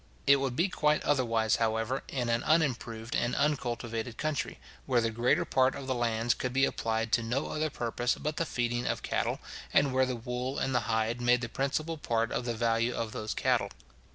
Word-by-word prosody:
It 140 0 +7
would 135 -2 -2
be 170 +7 +2
quite 150 -4 +1
otherwise, 115 -6 +2
however, 115 +3 0
in 125 -3 -2
an 115 0 +1
unimproved 120 -7 0
and 120 +1 0
uncultivated 120 -5 -1
country, 155 -1 -2 0.3
where 125 -3 +3
the 115 -1 0
greater 120 +2 +2
part 130 0 +2
of 140 - -6
the 130 - 0
lands 115 -1 +1
could 125 - -3
be 135 +1 +4
applied 115 0 -1
to 115 - +3
no 120 +5 -2
other 155 0 -1
purpose 120 -1 -1
but 150 +1 -4
the 165 - +1
feeding 120 0 -1
of - - -2
cattle, - - -1 0.3
and 140 -2 +3
where 130 0 +3
the 130 - -2
wool 125 +3 -4
and 135 - 0
the 125 - +3
hide 110 +2 0
made 120 0 +3
the 120 - -3
principal 150 +5 -2
part 115 -3 0
of 120 - -2
the 120 -1 -1
value 115 +1 +1
of 115 -2 -3
those 105 0 -4
cattle. - - +1
120 Hz, 205 wpm, -30 LUFS, 115-135 Hz, 0.3 s, It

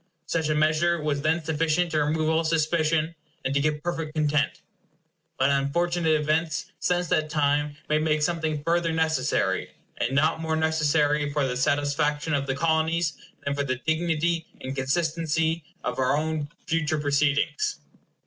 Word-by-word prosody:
Such 160 -2 -1
a 155 - +2
measure 155 +3 +2
was 150 -2 -1
then 160 +2 +1
sufficient 160 +2 +1
to 155 -1 +2
remove 155 +1 0
all 160 +1 +2
suspicion, 160 0 +1 0.3
and 135 - 0
to 140 - +2
give 150 +1 0
perfect 165 -3 -3
content. 150 -2 +1 0.8
But 135 +2 +3
unfortunate 160 +3 +1
events 155 +1 -1
since 180 0 0
that 155 0 +1
time 145 -1 +1
may 155 0 +2
make 155 -1 +1
something 160 -3 -1
further 170 +1 +1
necessary; 160 -1 0 0.2
and 135 - -1
not 155 +3 +2
more 160 -1 -1
necessary 150 -2 +2
for 145 -1 +1
the 125 - -2
satisfaction 145 +3 0
of 140 -1 0
the 135 - 0
Colonies 160 +1 +1 0.3
than 140 - 0
for 140 0 -1
the 130 -2 -1
dignity 165 +4 0
and 130 +1 -5
consistency 160 +3 0 0.2
of - - -3
our 130 +2 +2
own 155 -1 -2 0.2
future 155 -1 0
proceedings. 150 - +1
155 Hz, 155 wpm, -26 LUFS, 145-165 Hz, 0.8 s, But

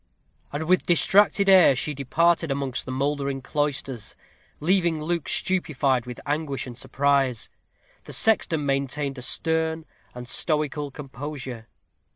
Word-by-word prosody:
And 145 +2 -3
with 180 +3 +2
distracted 200 +3 +4
air 185 -8 +7
she 150 +4 -2
darted 165 +4 +1
amongst 135 -2 -3
the - - -4
mouldering 140 0 -2
cloisters, 140 -5 -3 0.4
leaving 170 0 +1
Luke 165 0 -2
stupefied 140 -9 0
with 125 - -7
anguish 145 -1 -2
and 125 -2 -8
surprise. 135 -1 0 0.5
The - - -8
sexton 170 -8 +2
maintained 140 0 -1
a - - -8
stern 160 +4 -1 0.3
and 125 0 -8
stoical 150 0 0
composure. 135 -4 -7
145 Hz, 125 wpm, -25 LUFS, 135-160 Hz, 0.5 s, air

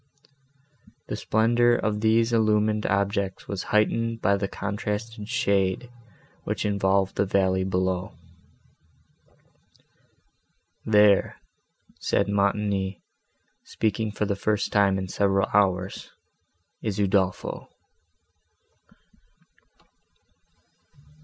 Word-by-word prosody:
The - - -2
splendour 120 +2 +2
of 105 -1 -1
these 115 +1 +2
illumined 105 -1 +2
objects 100 -1 -1
was 100 -2 -4
heightened 115 +2 0
by 100 -3 +2
the 100 0 -2
contrasted 105 +2 -5
shade, 100 -1 0 0.5
which - - -3
involved 100 -1 +1
the 100 - +2
valley 95 -1 +1
below. 95 -1 -2 2.7
"There," 105 -2 +4 0.6
said - - 0
Montoni, 100 -2 0 0.6
speaking 110 0 -2
for 105 0 -2
the 100 -1 -1
first 105 +1 -1
time 100 -2 +3
in 95 0 -4
several 95 +1 +1
hours, 95 -2 +1 0.7
"is 105 -3 -3
Udolpho." 95 -2 -1
100 Hz, 85 wpm, -25 LUFS, 95-110 Hz, 2.7 s, There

